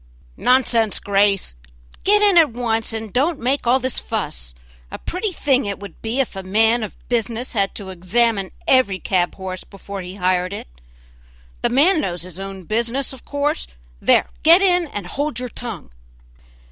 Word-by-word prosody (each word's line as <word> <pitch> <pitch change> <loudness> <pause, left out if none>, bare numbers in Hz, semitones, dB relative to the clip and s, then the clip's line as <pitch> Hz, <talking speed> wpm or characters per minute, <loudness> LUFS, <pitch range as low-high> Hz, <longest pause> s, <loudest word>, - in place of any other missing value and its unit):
"Nonsense, 235 -4 +3
Grace, 200 - +1 0.5
get 420 +1 +4
in 405 -3 +5
at 330 -3 +7
once, 225 -2 -1
and 220 -2 -5
don't 295 +5 +1
make 255 +1 -1
all 255 +2 +4
this 260 0 +1
fuss; - - -5 0.3
a - - -6
pretty 375 +4 -3
thing 275 -7 +1
it 200 -1 -3
would 200 -4 -11
be 225 +4 -2
if 260 -6 0
a 195 - -4
man 220 +5 +2
of 215 - -6
business 240 +1 -1
had 200 -3 0
to 200 -3 -6
examine 195 +2 +1 0.2
every 235 -8 +4
cab 180 -1 0
horse 185 -1 -6
before 200 0 -8
he 180 +1 -8
hired 185 0 0
it - - -7 0.9
the - - +2
man 310 +7 +4
knows 175 - -3
his 180 0 -9
own 195 -1 -7
business 235 +8 -1
of 260 - -13
course; 290 +2 -1 0.3
there, - - +4
get 330 +3 +7
in 360 -3 +3
and 205 -9 -6
hold 285 +8 -3
your 250 0 -4
tongue!" 225 - -7
225 Hz, 170 wpm, -20 LUFS, 195-265 Hz, 0.9 s, at